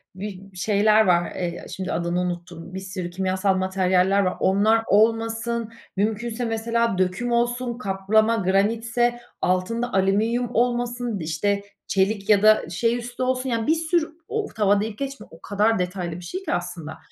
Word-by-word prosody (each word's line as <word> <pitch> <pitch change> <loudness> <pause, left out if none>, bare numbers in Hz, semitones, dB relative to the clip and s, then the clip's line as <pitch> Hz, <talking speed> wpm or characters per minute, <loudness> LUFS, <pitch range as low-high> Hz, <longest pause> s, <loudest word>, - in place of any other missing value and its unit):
bi 195 0 -8
şeyler 215 +3 +4
var, 175 -2 +2
eee, 175 -1 -4
şimdi 190 -1 -4
adını 170 +1 -1
unuttuğum 175 0 -5
bir 190 - -4
sürü 190 -2 -5
kimyasal 190 +2 0
materyaller 185 +1 +2
var, 185 - -1
onlar 215 +4 +3
olmasın, 225 +2 +1 0.3
mümkünse 220 +4 -1
mesela 230 -1 0
döküm 185 +6 0
olsun, 240 0 0
kaplama, 215 +1 +2
granitse, 230 +5 +1 0.2
altında 230 +7 0
alüminyum 215 +6 +1
olmasın, 240 -2 0
işte 190 +6 -1 0.2
çelik 195 +1 0
ya 205 -2 +6
da 215 -5 +5
şey 230 +7 +1
üstü 245 +1 -5
olsun, 255 +1 0
yani 230 0 -1
bir 315 - +4
sürü 330 0 0 0.2
o 440 -1 -2
tava 205 -1 +3
deyip 215 -1 -4
geçme, 275 -5 -5
o 165 - -16
kadar 210 +1 +1
detaylı 180 -1 -2
bir 180 - -8
şey 370 - -5
ki 340 - -2
aslında. 175 -3 -4
210 Hz, 155 wpm, -24 LUFS, 185-235 Hz, 0.3 s, ya